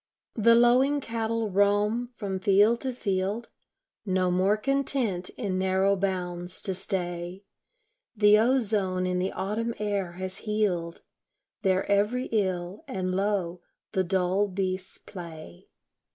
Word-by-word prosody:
The 230 Hz, +1 st, +5 dB
lowing 255 Hz, +5 st, +4 dB
cattle 225 Hz, -3 st, -2 dB
roam 205 Hz, +4 st, +2 dB
from 195 Hz, -5 st, -4 dB
field 205 Hz, +5 st, +4 dB
to 260 Hz, -, -1 dB
field; 205 Hz, 0 st, -2 dB, 0.5 s
No 185 Hz, -2 st, +1 dB
more 190 Hz, +4 st, +2 dB
content 255 Hz, -7 st, 0 dB
in 190 Hz, -5 st, -2 dB
narrow 190 Hz, +1 st, +2 dB
bounds 180 Hz, -2 st, -2 dB
to 190 Hz, -, +1 dB
stay; 180 Hz, -1 st, -3 dB, 0.7 s
The 210 Hz, 0 st, +6 dB
ozone 210 Hz, -7 st, +1 dB
in 180 Hz, 0 st, 0 dB
the 185 Hz, +1 st, -1 dB
autumn 220 Hz, +4 st, -2 dB
air 200 Hz, -4 st, -2 dB
has 185 Hz, +1 st, -5 dB
healed 195 Hz, -6 st, -1 dB, 0.6 s
Their 190 Hz, -2 st, +1 dB
every 210 Hz, +6 st, +1 dB
ill, 190 Hz, -2 st, -1 dB
and 185 Hz, -1 st, -2 dB
lo, 190 Hz, -3 st, -1 dB, 0.3 s
the 190 Hz, -3 st, +1 dB
dull 190 Hz, +2 st, +1 dB
beasts 185 Hz, -1 st, -3 dB
play. 160 Hz, -, -10 dB
195 Hz, 125 wpm, -27 LUFS, 185-215 Hz, 0.7 s, The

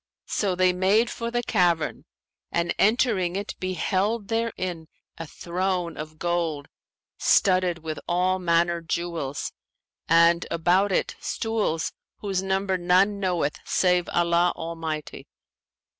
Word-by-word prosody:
So 195 Hz, -3 st, 0 dB
they 185 Hz, 0 st, +3 dB
made 200 Hz, +6 st, +2 dB
for 230 Hz, 0 st, -4 dB
the 240 Hz, 0 st, -1 dB
cavern, 175 Hz, -8 st, +1 dB, 0.5 s
and 170 Hz, 0 st, 0 dB
entering 205 Hz, -5 st, +2 dB
it 200 Hz, +1 st, -3 dB
beheld 195 Hz, +4 st, -1 dB
therein 185 Hz, -8 st, -2 dB, 0.3 s
a 165 Hz, -, -5 dB
throne 180 Hz, +1 st, -2 dB
of 155 Hz, +1 st, -8 dB
gold 165 Hz, -4 st, -1 dB, 0.5 s
studded 185 Hz, -4 st, +3 dB
with 155 Hz, -1 st, -4 dB
all 185 Hz, +2 st, +1 dB
manner 170 Hz, -1 st, +1 dB
jewels, 165 Hz, -4 st, -3 dB, 0.6 s
and 170 Hz, +1 st, +4 dB
about 180 Hz, +4 st, +2 dB
it -, -, 0 dB
stools 215 Hz, -8 st, -2 dB, 0.2 s
whose 195 Hz, -3 st, -2 dB
number 190 Hz, 0 st, 0 dB
none 185 Hz, +3 st, +3 dB
knoweth 175 Hz, -6 st, -1 dB
save 180 Hz, -1 st, +1 dB
Allah 175 Hz, 0 st, +2 dB
Almighty. 160 Hz, -2 st, -5 dB
180 Hz, 115 wpm, -25 LUFS, 170-195 Hz, 0.6 s, and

